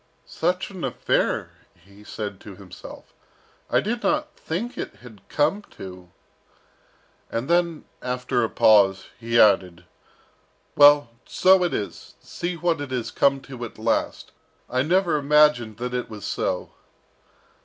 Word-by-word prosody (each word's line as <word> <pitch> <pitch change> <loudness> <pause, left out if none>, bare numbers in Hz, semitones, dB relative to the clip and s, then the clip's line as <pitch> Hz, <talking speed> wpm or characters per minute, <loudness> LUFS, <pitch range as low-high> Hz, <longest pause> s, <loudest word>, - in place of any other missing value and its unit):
"Such 180 +4 -2
an 185 -3 -8
affair!" 130 - -1 0.2
he 100 +4 -19
said 105 -2 -6
to 100 - -11
himself. 95 -1 -12 0.6
"I - - +3
did 235 +3 -3
not 300 +2 -1
think 205 +10 -4
it - - -6
had 110 -5 -15
come 155 +8 +1 0.2
to 90 -2 -10 0.6
" - - -36
and 115 +3 -3
then 170 -1 +1 0.2
after 125 -1 -1
a 115 - 0
pause, 100 -3 +4
he 115 0 +1
added, 90 -4 +3 0.9
"Well, 145 -3 +6 0.2
so 185 0 +4
it 175 - 0
is! 100 - -6
see 175 0 -5
what 165 -2 0
it 145 - -5
has 125 -3 -3
come 140 -1 +2
to 130 -3 -9
at 115 - -8
last! 110 +1 -1 0.4
and 125 - -4
I - - +5
never 175 -5 +2
imagined 145 -7 +3
that 125 +1 -4
it 125 0 -3
was 105 -3 -8
so!" - - -2
125 Hz, 145 wpm, -24 LUFS, 110-170 Hz, 0.9 s, Well